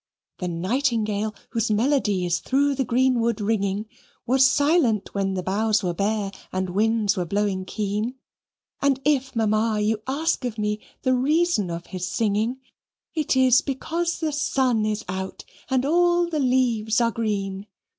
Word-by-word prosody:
The 180 - -3
nightingale, 215 +3 -1 0.2
whose 225 0 0
melody 215 -4 +1
is 175 0 0
through 280 +5 +1
the 270 0 0
greenwood 240 -2 +1
ringing, 205 -1 0 0.4
Was 260 +2 +4
silent 285 - +2
when 195 -1 -1
the 185 - -2
boughs 210 +2 +1
were 175 -1 0
bare 200 +2 -1 0.2
and 185 -1 -2
winds 215 0 +2
were 180 - -1
blowing 200 0 -1
keen: 210 +4 -2 0.7
And 280 -2 +2
if, 270 -3 +1
Mamma, 215 0 +1
you 215 +1 0
ask 300 +2 0
of 240 -3 -3
me 210 0 -1 0.2
the 255 -1 +3
reason 290 - +2
of 170 0 -5
his 185 -1 -5
singing, 225 +5 0 0.5
It 310 -4 0
is 260 0 +5
because 335 +5 -2
the 315 -1 0
sun 255 -6 +1
is 215 0 -2
out 190 +1 -5 0.2
and 260 0 +1
all 345 +2 +3
the 320 -3 -2
leaves 245 -4 +2
are 230 -1 +2
green. 200 -3 -3
225 Hz, 155 wpm, -24 LUFS, 205-265 Hz, 0.7 s, is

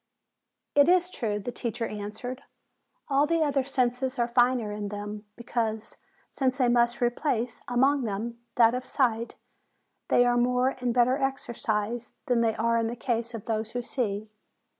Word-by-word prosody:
"It 285 +2 +5
is 360 0 +4
true," 215 -9 -2
the 210 +4 -4
teacher 235 -1 -3
answered. 215 +5 -6 0.7
"All 280 +1 +3
the 330 0 +2
other 280 -3 +1
senses 255 0 0
are 235 -1 +1
finer 240 -2 +2
in 205 0 -4
them, 205 +1 -6
because, 225 -2 -3 0.3
since 260 -1 0
they 255 -3 +3
must 240 0 +2
re 240 0 +3
place, 245 -3 -2
among 265 +2 +2
them, 225 +3 -4 0.2
that 230 -1 +6
of 250 0 -2
sight, 235 -4 0 0.7
they 245 - +4
are 245 0 +3
more 250 +1 +3
and 250 -2 -2
better 250 +3 +3
exercised 235 -4 -2
than 245 -2 +2
they 225 -1 +2
are 230 +1 +1
in 225 - 0
the 235 - -3
case 235 -1 -2
of 220 - -7
those 220 0 -2
who 245 0 -2
see. 215 -4 -3
240 Hz, 165 wpm, -27 LUFS, 225-255 Hz, 0.7 s, that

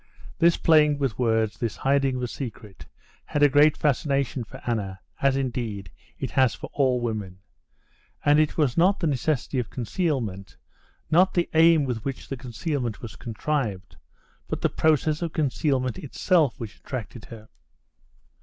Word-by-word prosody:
This 170 0 +4
playing 150 -2 +4
with 135 -6 -2
words, 110 -3 +1
this 115 -3 -2
hiding 135 -1 +1
of 125 - -3
a - - -1
secret, 115 -6 -8 0.4
had 145 - 0
a - - +9
great 145 +2 +4
fascination 140 -3 0
for 110 - -11
Anna, 100 -5 -2 0.2
as, 135 -1 +3
indeed, 115 -8 -3 0.3
it - - -4
has 130 -3 +3
for - - -9
all 130 -3 +2
women. 105 -6 -4 0.9
And 145 +1 +5
it 155 -1 +1
was 145 -6 +2
not 185 +4 +3
the 170 - -1
necessity 145 -2 0
of 120 -2 -3
concealment, 115 - -3 0.5
not 185 +4 +4
the 175 -1 0
aim 165 -1 +6
with 120 -4 -3
which 135 -1 -5
the 135 - -3
concealment 125 -1 -4
was 115 - -7
contrived, 115 - -3 0.5
but - - -4
the - - +2
process 155 0 +1
of 170 -1 -3
concealment 140 -3 0
itself 155 - +1
which 110 -3 -7
attracted 120 -2 -7
her. 110 -2 -12
130 Hz, 155 wpm, -25 LUFS, 115-150 Hz, 0.9 s, a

